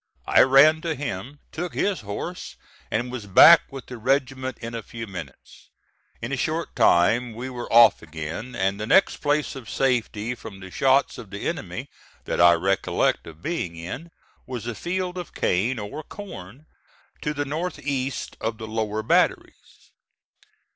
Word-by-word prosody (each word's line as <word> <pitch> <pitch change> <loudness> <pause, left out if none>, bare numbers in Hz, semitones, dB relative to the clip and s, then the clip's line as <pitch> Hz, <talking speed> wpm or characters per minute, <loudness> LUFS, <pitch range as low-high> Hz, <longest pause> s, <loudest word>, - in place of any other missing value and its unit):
I - - +5
ran 140 +4 +6
to 165 -2 -2
him, 135 +1 -6
took 175 +2 -5
his 200 -2 0
horse 105 - -6 0.3
and 120 +3 -2
was 120 -5 -6
back 155 - +8
with 135 -3 -8
the 125 -2 -9
regiment 130 0 0
in 115 0 -7
a 115 - -4
few 115 +1 -8
minutes. 90 - -10 0.5
In - - -3
a - - -1
short - - -2
time 110 +7 +3
we 130 +3 -6
were 120 -1 -6
off 115 +1 +7
again; 80 +10 -6
and 95 0 0
the 105 - -4
next 190 - +4
place 145 -1 0
of 130 -5 -9
safety 120 -3 0
from 110 -4 -10
the 95 -1 -10
shots 135 +4 +2
of 110 -5 -10
the 100 +1 -5
enemy - - -4 0.4
that - - 0
I 85 0 +8
recollect 95 +1 0
of 80 +1 -12
being 125 - -3
in, 110 - -7 0.4
was 125 -3 -5
a 120 - -3
field 180 - -3
of 175 - -9
cane 110 +9 +1
or 115 +8 -6
corn 150 - -10 0.6
to 150 - -1
the 145 0 -1
north 160 +5 -3
east 135 -2 -3
of 110 0 -2
the 110 - -7
lower 110 -1 -2
batteries. - - -1
120 Hz, 170 wpm, -24 LUFS, 105-145 Hz, 0.6 s, back